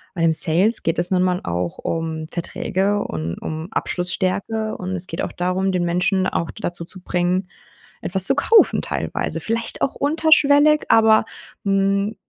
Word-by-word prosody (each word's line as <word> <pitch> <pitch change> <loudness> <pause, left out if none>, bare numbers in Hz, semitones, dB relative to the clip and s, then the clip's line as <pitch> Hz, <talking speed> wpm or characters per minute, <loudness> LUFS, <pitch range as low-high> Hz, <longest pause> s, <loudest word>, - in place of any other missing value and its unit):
weil 165 -2 0
im 160 - +3
Sales 180 +9 +4
geht 165 +1 -1
es 175 - 0
nun 180 0 +2
mal 180 -1 0
auch 85 0 -4
um 160 -1 -4
Verträge 195 +4 -2
und 80 +1 -5
um 160 +3 -6
Abschlussstärke, 195 +5 -2
und 185 0 -6
es 180 +1 -2
geht 165 - -4
auch - - -4
darum, 185 +2 -1
den 180 -1 -1
Menschen 180 +2 0
auch 165 - -3
dazu 175 -5 -5
zu 185 +1 -4
bringen, 180 +1 -1 0.6
etwas 190 +1 +4
zu 270 - +6
kaufen 440 +10 +4
teilweise - - -3
vielleicht 230 +1 -4
auch 270 - -1
unterschwellig, 300 0 +3
aber, 220 -1 +5 0.4
hm, 200 +2 0
185 Hz, 160 wpm, -20 LUFS, 170-215 Hz, 0.6 s, zu